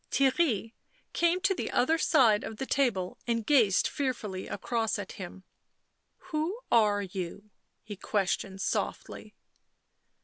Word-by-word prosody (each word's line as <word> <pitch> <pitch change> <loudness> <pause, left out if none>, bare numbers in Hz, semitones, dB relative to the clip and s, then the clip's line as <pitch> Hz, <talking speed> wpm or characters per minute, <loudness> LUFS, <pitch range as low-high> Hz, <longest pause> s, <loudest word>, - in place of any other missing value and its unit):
Theirry 260 - +1 0.4
came 345 +2 +2
to 390 0 +3
the - - -4
other 320 +7 +2
side 245 -11 +4
of 220 - -6
the 265 - -3
table 235 -11 0
and 230 -2 0
gazed, 230 -10 +4
fearfully, 235 -9 -3
across 225 +1 -1
at 200 -2 -6
him. 190 -1 -9 0.4
" - - -49
Who 320 +8 -1
are 210 -3 +4
you 190 +2 -6
?" - - -50
he 210 -2 -8
questioned 195 -1 -1
softly. - - -3
225 Hz, 135 wpm, -29 LUFS, 200-275 Hz, 0.4 s, side